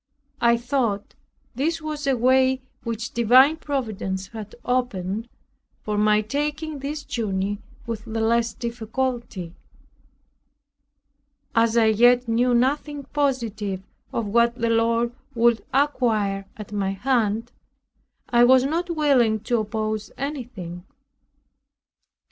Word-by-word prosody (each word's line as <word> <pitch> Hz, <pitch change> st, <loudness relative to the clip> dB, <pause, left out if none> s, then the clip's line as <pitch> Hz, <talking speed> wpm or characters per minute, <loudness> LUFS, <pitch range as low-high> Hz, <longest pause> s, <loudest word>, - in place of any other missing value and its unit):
I 235 Hz, 0 st, +5 dB
thought 235 Hz, -4 st, -1 dB, 0.4 s
this 320 Hz, +6 st, -1 dB
was 305 Hz, -2 st, -5 dB
a 270 Hz, -2 st, +2 dB
way 260 Hz, +2 st, +3 dB, 0.2 s
which 230 Hz, 0 st, -4 dB
divine 255 Hz, +6 st, +6 dB
Providence 215 Hz, -10 st, -3 dB
had 215 Hz, -2 st, -8 dB
opened, 230 Hz, -3 st, -1 dB, 0.5 s
for 210 Hz, -, -2 dB
my 210 Hz, 0 st, +3 dB
taking 295 Hz, +6 st, -3 dB
this 290 Hz, +2 st, -4 dB
journey 205 Hz, -5 st, -2 dB, 0.2 s
with 230 Hz, -2 st, -5 dB
the 225 Hz, 0 st, -3 dB
less 230 Hz, 0 st, +1 dB
difficulty. 235 Hz, -5 st, -3 dB, 2.0 s
As 230 Hz, 0 st, +3 dB
I 230 Hz, -, +5 dB
yet 240 Hz, +3 st, +4 dB
knew 240 Hz, +2 st, +2 dB
nothing 285 Hz, +3 st, 0 dB
positive 225 Hz, -9 st, -1 dB, 0.3 s
of 230 Hz, -, -2 dB
what 235 Hz, +3 st, +3 dB
the 230 Hz, -2 st, 0 dB
Lord 230 Hz, +1 st, +2 dB, 0.2 s
would 235 Hz, -1 st, +3 dB
acquire 220 Hz, -8 st, +1 dB
at 210 Hz, -1 st, -9 dB
my 195 Hz, -2 st, -1 dB
hand, 230 Hz, 0 st, 0 dB, 0.8 s
I 240 Hz, 0 st, +4 dB
was 255 Hz, +1 st, +6 dB
not 335 Hz, +6 st, -1 dB
willing 270 Hz, -9 st, +3 dB
to 235 Hz, +1 st, 0 dB
oppose 215 Hz, 0 st, -3 dB
anything. 240 Hz, -, -5 dB
235 Hz, 115 wpm, -24 LUFS, 215-260 Hz, 2.0 s, divine